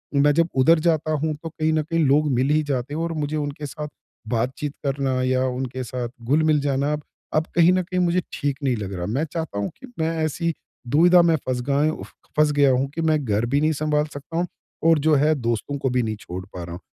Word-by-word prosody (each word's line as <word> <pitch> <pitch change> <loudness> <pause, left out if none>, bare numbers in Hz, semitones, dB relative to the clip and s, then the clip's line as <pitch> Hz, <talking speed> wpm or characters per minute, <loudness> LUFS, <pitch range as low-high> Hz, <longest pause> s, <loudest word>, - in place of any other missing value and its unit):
मैं 145 +1 +5
जब 165 +1 +3
उधर 155 +5 +5
जाता 155 -2 +1
हूँ 155 0 0
तो 165 - -4
कहीं 160 0 -1
न 155 - +2
कहीं 165 +2 -1
लोग 150 +3 +3
मिल 130 +3 +1
ही 155 +1 +3
जाते 140 -1 -2
हैं 160 - -2
और 170 0 -2
मुझे 150 -1 -2
उनके 145 0 -4
साथ, 150 +2 -6 0.4
बातचीत 130 +5 -2
करना 135 -2 0
या 130 0 +1
उनके 130 0 -3
साथ 120 -1 -4
घुल 145 +7 +2
मिल 155 -2 +3
जाना 140 +1 0
ब 150 - -8 0.3
अब 155 - +3
कहीं 170 +1 +6
न 185 0 +2
कहीं 185 +1 -2
मुझे 180 +1 +2
ठीक 140 -1 -1
नहीं 130 -3 +2
लग 100 -2 -5
रहा। 90 -1 -3
मैं 130 - -1
चाहता 160 -11 -3
हूँ 100 - -1
कि 265 - -11
मैं 160 0 +1
ऐसी 165 +2 -1 0.4
दुविधा 175 +5 +6
में 165 -1 +4
फँस 125 -1 0
गाएँ 145 +3 +3
उफ़ - - -8 0.3
फँस 150 -1 +4
गया 145 -1 +4
हूँ 130 +2 +1
कि 165 - -3
मैं 155 -1 +3
घर 110 +1 +1
भी 140 +4 +1
नहीं 155 +1 +3
सँभाल 150 0 +1
सकता 145 +4 -7
हूँ 175 - +1 0.4
और 160 -2 +5
जो 155 - +5
है 150 +3 +4
दोस्तों 120 +2 -2
को 135 -1 -1
भी 125 0 +1
नहीं 110 -1 -2
छोड़ 90 -2 -7
पा 90 -2 -8
रहा 85 - -8
हूँ। 90 - -7
145 Hz, 245 wpm, -23 LUFS, 130-155 Hz, 0.4 s, कहीं